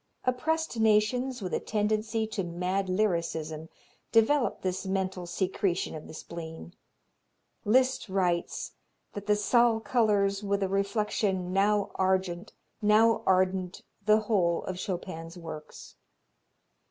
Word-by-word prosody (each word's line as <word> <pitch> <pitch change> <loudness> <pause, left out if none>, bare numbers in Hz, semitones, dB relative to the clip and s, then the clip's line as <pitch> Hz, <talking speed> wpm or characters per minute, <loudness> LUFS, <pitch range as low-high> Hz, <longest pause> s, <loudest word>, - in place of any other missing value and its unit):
Oppressed 300 +1 0
nations 225 +3 +2
with 180 - -4
a - - +1
tendency 215 +1 0
to 215 -3 -3
mad 180 +3 -2
lyrism 165 -5 -1 0.4
develop 240 +4 +3
this 185 0 -1
mental 190 -2 -2
secretion 185 0 -1
of 155 -1 -8
the - - -10
spleen. 165 +1 -8 0.9
Liszt 255 +1 +2
writes 180 -3 -1 0.4
that 205 0 -7
"the 210 - +4
Zal 230 +2 +3
colors 205 -3 +2
with 200 -1 0
a - - +1
reflection 195 -2 0
now 200 +1 +2
argent, 185 -2 0 0.3
now 220 +2 +4
ardent 185 -1 +1 0.2
the 215 +1 +4
whole 185 -6 +1
of 185 -1 -5
Chopin's 175 -2 -5
works." 160 -3 -9
195 Hz, 115 wpm, -29 LUFS, 180-215 Hz, 0.9 s, the